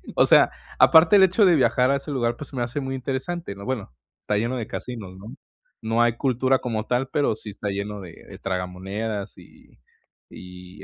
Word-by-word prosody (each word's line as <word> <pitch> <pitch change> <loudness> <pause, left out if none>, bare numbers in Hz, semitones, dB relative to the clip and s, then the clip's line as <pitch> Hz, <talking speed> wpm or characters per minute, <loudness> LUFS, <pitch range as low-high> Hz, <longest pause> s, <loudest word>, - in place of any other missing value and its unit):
o - - +5
sea, - - +6 0.3
aparte 160 +5 +7
el 190 - +7
hecho 190 +3 +4
de 175 - +5
viajar 130 -2 +3
a - - +3
ese 140 +2 -7
lugar, 120 -3 -1
pues 150 - -8
se - - -11
me 120 - 0
hace 120 +5 -3
muy 135 0 -4
interesante, 135 - -4
¿no? 100 0 -10
Bueno, 120 - -4 0.3
está 105 - -2
lleno 120 +4 -1
de 115 - -4
casinos, 105 -7 -7
¿no? 100 +3 -11 0.5
No 115 +1 0
hay 120 0 +2
cultura 130 0 +1
como 110 -3 -3
tal, 125 +2 0
pero 145 -7 +1
sí 110 - -9
está 100 +1 -5
lleno 100 +1 -4
de 85 -3 -10 0.2
de - - -11
tragamonedas 95 +3 -4
y - - -19 0.5
y 90 0 -12
120 Hz, 205 wpm, -24 LUFS, 100-135 Hz, 0.5 s, aparte